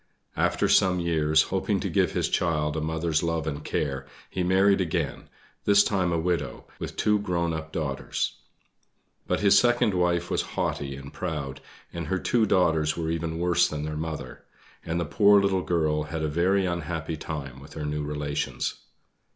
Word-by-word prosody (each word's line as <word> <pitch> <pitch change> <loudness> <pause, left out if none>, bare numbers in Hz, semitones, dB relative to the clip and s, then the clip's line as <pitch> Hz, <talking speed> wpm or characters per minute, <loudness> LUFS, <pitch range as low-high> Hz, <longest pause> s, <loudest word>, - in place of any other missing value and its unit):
After - - +1
some 90 -1 +4
years, 80 -2 +3
hoping - - +1
to - - -1
give - - +1
his - - +1
child 75 -3 0
a 80 - -1
mother's 80 0 0
love 85 -2 -1
and 75 -1 -4
care, 70 -3 -2 0.2
he 90 - -2
married 95 +2 +4
again, 85 -4 -2 0.4
this 100 0 +6
time 95 -4 0
a 85 - +1
widow, 85 +1 -2
with - - -5
two 105 0 +2
grown 85 -4 -1
up 80 0 -5
daughters. 70 -4 -2 0.9
But - - 0
his 100 -1 +6
second 120 -3 +3
wife 85 -1 +1
was - - +2 0.2
haughty 70 -1 -1
and 70 +1 -10
proud, 75 -7 -4 0.3
and 85 -2 -4
her 95 - 0
two 110 +4 +2
daughters 80 -5 +2
were 80 -1 -1
even 80 0 -2
worse 90 +1 +3
than 75 -1 -4
their 75 0 -4
mother; 80 0 -5 0.4
and 85 +1 -2
the 85 - -1
poor 100 +6 +5
little 100 -1 +1
girl 80 -4 +1
had 80 +1 -4
a - - +1
very 90 +5 +2
unhappy 85 -2 -3
time 70 -4 -6
with 70 +2 -13
her 75 -2 -4
new 75 0 -2
relations. 75 -1 -2
80 Hz, 175 wpm, -26 LUFS, 75-90 Hz, 0.9 s, this